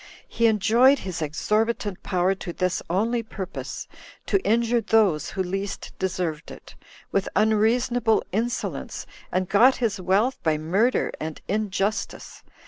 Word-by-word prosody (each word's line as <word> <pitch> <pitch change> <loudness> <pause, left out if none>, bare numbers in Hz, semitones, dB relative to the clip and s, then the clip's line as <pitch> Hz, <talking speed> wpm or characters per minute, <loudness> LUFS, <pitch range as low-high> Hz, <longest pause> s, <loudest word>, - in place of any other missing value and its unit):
He 230 - +2
enjoyed 230 +6 +4
his 185 -8 -5
exorbitant 210 +6 -1
power 185 0 +1
to 190 -2 -6
this 185 +1 -1
only 225 +7 +1
purpose, 195 -4 -6 0.4
to 395 - +1
injure 235 +1 +2
those 200 -8 +2
who 190 - -2
least 195 +2 -4
deserved 180 -4 -2
it, - - -12 0.4
with 195 - 0
unreasonable 220 +2 +2
insolence 230 +5 -3 0.3
and 185 0 0
got 230 +7 +5
his 220 -6 -1
wealth 205 +8 +1
by 155 -2 +1
murder 195 +11 +1
and 155 0 -5
injustice. 205 0 -2
205 Hz, 130 wpm, -24 LUFS, 185-230 Hz, 0.4 s, got